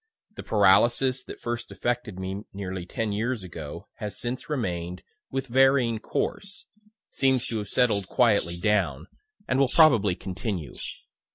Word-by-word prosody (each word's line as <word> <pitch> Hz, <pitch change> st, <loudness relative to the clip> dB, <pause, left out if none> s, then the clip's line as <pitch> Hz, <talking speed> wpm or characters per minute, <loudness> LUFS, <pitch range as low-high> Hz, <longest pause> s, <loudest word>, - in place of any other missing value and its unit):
The -, -, -6 dB
paralysis 120 Hz, +6 st, +3 dB
that -, -, -9 dB
first 120 Hz, 0 st, -4 dB
affected 120 Hz, -5 st, -2 dB
me 95 Hz, +1 st, -4 dB
nearly 95 Hz, -2 st, -5 dB
ten 110 Hz, +2 st, -2 dB
years 110 Hz, +1 st, -1 dB
ago, 85 Hz, -1 st, -8 dB
has 105 Hz, -2 st, -5 dB
since 125 Hz, +4 st, -4 dB
remain'd, 90 Hz, -, -3 dB, 0.3 s
with 135 Hz, 0 st, -2 dB
varying 130 Hz, -2 st, +3 dB
course 200 Hz, -, -3 dB, 0.5 s
seems 130 Hz, -2 st, +2 dB
to 115 Hz, -, -2 dB
have 105 Hz, -1 st, -6 dB
settled 105 Hz, -6 st, +2 dB
quietly 100 Hz, -8 st, +2 dB
down, 85 Hz, -7 st, +1 dB, 0.4 s
and 130 Hz, -, +1 dB
will 135 Hz, -2 st, +4 dB
probably 120 Hz, -, +5 dB
continue. 95 Hz, -, -4 dB
110 Hz, 140 wpm, -26 LUFS, 95-125 Hz, 0.5 s, probably